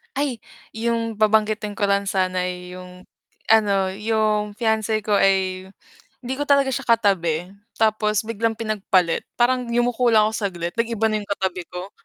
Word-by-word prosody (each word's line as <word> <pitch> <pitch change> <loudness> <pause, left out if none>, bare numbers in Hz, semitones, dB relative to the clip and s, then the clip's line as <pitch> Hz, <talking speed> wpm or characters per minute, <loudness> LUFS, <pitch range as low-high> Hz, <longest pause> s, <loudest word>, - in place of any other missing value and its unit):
Ay, 270 -5 -2 0.3
yung 230 -1 -1
babanggitin 215 0 +1
ko 205 0 -1
lang 200 0 +2
sana 185 -2 0
yung 180 0 -9 0.4
ano, 200 -3 +3
yung 215 -1 0
fiance 220 -1 +1
ko 210 -1 +1
ay 190 -1 +1 0.5
hindi 255 +1 -4
ko 290 - -2
talaga 280 -1 +3
siya 260 - -2
katabi 180 -7 +2 0.3
tapos 215 -1 +2
biglang 230 0 -1
pinagpalit 200 -6 0 0.2
parang 250 +1 +2
yumuko 240 0 +2
lang 215 -1 +5
ako - - -9
saglit 175 -4 -4
nag-iba 230 -1 0
na 215 0 0
yung 205 - -17
katabi 185 -2 -3
ko. 180 +2 -6
215 Hz, 150 wpm, -22 LUFS, 190-230 Hz, 0.5 s, lang